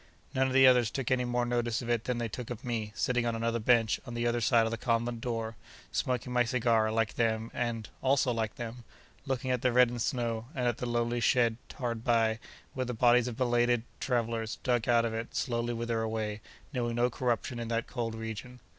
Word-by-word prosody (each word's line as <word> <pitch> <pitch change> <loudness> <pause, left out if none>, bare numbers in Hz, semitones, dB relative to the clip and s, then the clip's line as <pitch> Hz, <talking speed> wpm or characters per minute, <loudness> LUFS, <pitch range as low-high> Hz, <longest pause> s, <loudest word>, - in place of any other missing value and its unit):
None 130 0 +2
of 130 - -2
the 135 0 +7
others 125 -3 +6
took 130 +1 -3
any 125 -1 +2
more 120 0 0
notice 120 0 0
of 120 - -6
it 115 -2 0
than 125 -1 -1
they 120 -1 -1
took 120 +2 -6
of 120 -1 -6
me, 110 -3 -2
sitting 125 -1 +1
on 115 - 0
another 115 +1 0
bench 115 -1 +3
on 120 - -6
the 120 0 -1
other 120 0 +1
side 115 +2 +4
of 115 - -2
the - - 0
convent 115 -1 0
door, 115 -2 -3 0.4
smoking 125 -1 -1
my 125 0 +4
cigar, 115 -3 +2
like 115 -1 0
them, 115 -1 0
and—also 125 +3 0
like 110 -2 -2
them—looking 125 +2 -6
at 125 -2 0
the 125 - +2
reddened 120 -1 +4
snow, 115 -2 -1
and 125 -2 0
at 120 -1 0
the 125 - -2
lonely 120 0 0
shed 115 -1 +3 0.2
hard 120 -4 -3
by, 115 -2 +2 0.3
where 130 -1 -2
the 125 - -3
bodies 120 +1 +4
of 120 -2 -5
belated 120 -2 +2 0.2
travellers, 115 -3 -1
dug 120 -2 +1
out 120 -1 +4
of 115 - -2
it, 115 +1 -5
slowly 120 -2 -1
wither 115 -1 -1
away, 110 -1 -2 0.3
knowing 120 -2 -1
no 120 +1 +2
corruption 120 0 -1
in 115 - -4
that 115 0 -1
cold 115 -3 -3
region. 110 +3 -6
120 Hz, 210 wpm, -30 LUFS, 115-125 Hz, 0.4 s, the